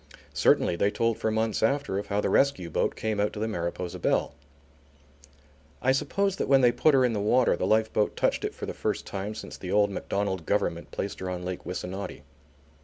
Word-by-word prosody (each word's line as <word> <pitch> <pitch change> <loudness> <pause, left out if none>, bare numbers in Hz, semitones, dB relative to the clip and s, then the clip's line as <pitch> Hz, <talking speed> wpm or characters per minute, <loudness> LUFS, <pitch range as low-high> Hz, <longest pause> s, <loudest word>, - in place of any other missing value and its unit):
Certainly 85 - +3
they 100 - +3
told 115 +1 0
for 110 - 0
months 110 0 0
after 115 -4 +1
of 100 - -6
how 100 0 0
the - - 0
rescue 95 -12 +2
boat - - 0
came 110 -2 -2
out 105 +1 +1
to 105 - -6
the 110 - -1
Mariposa 85 -3 -4
Belle. - - +1 1.5
I 130 - +2
suppose 195 +8 0
that - - -1
when 135 -1 +5
they 120 -1 +5
put 140 +5 +3
her 130 -1 +5
in 120 - +1
the 105 - -1
water 120 +3 +3
the 90 - -1
lifeboat 110 0 +2
touched - - 0
it - - -3
for - - -5
the - - -5
first - - -2
time 100 +2 -5
since - - -8
the 90 - -5
old 105 0 +3
Macdonald 95 -3 -2
Government - - 0
placed 100 - -4
her 95 - -4
on 90 -1 -4
Lake 90 0 -5
Wissanotti. 90 +2 -5
105 Hz, 210 wpm, -27 LUFS, 95-115 Hz, 1.5 s, when